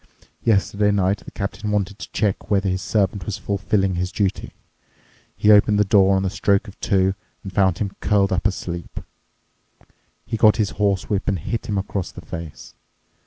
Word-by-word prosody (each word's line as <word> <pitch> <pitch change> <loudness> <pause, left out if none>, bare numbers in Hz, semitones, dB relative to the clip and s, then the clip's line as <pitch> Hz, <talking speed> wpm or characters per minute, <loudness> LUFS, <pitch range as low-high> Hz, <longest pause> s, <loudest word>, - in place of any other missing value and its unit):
Yesterday 105 -1 +2
night 100 0 +1
the - - -11
captain 105 +1 -4
wanted 100 0 -1
to - - -8
check 105 -1 -1
whether 100 -1 +2
his 95 0 -1
servant 95 0 0
was 105 - -3
fulfilling 100 -1 0
his 90 +1 -2
duty. 100 -2 -2 0.9
He 105 - +4
opened 105 0 +5
the 105 - +3
door 100 -1 +4
on 95 - +1
the 95 - -1
stroke 100 0 +1
of 100 - -13
two 95 -1 +2 0.3
and 95 -2 -8
found 95 -3 +2
him 100 -1 -3
curled 100 -1 +2
up 90 +2 +1
asleep. 85 -3 -5 1.3
He 115 - -3
got 110 +1 +5
his 105 -3 0
horsewhip 100 0 -1
and 100 - +1
hit 110 +8 -4
him 105 - -1
across 95 -1 -3
the - - -12
face. 85 -2 -8
100 Hz, 175 wpm, -22 LUFS, 95-105 Hz, 1.3 s, opened